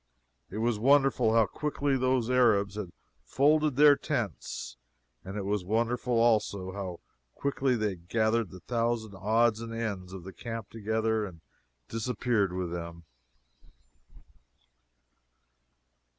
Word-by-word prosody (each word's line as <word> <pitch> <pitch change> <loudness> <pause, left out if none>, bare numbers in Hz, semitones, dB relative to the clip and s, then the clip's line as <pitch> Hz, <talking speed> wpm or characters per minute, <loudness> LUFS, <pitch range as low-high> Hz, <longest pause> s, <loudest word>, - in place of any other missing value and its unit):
It 100 - -7
was 115 -1 0
wonderful 135 -3 +4
how 115 -1 +5
quickly 145 +4 -1
those 130 -2 +1
Arabs 115 -6 +3
had 100 -4 -5 0.3
"folded 150 - +2
their 145 +1 +7
tents;" - - -4 0.5
and 95 +2 -6
it 100 - -3
was 100 -1 -1
wonderful, 120 +5 0
also, 105 -5 +2
how 95 -3 -6 0.3
quickly 135 -2 0
they 110 -2 0
had 85 -2 -10
gathered 110 -2 +1
the 90 0 -12
thousand 115 -3 -1
odds 110 +3 +2
and 115 0 -6
ends 105 -5 -4
of 95 -2 -8
the 95 +1 -9
camp 115 -3 -7
together 110 0 0
and 90 -5 -8 0.5
disappeared 115 -3 0
with 90 -1 -3
them. 85 -1 -6
110 Hz, 125 wpm, -29 LUFS, 100-120 Hz, 0.5 s, their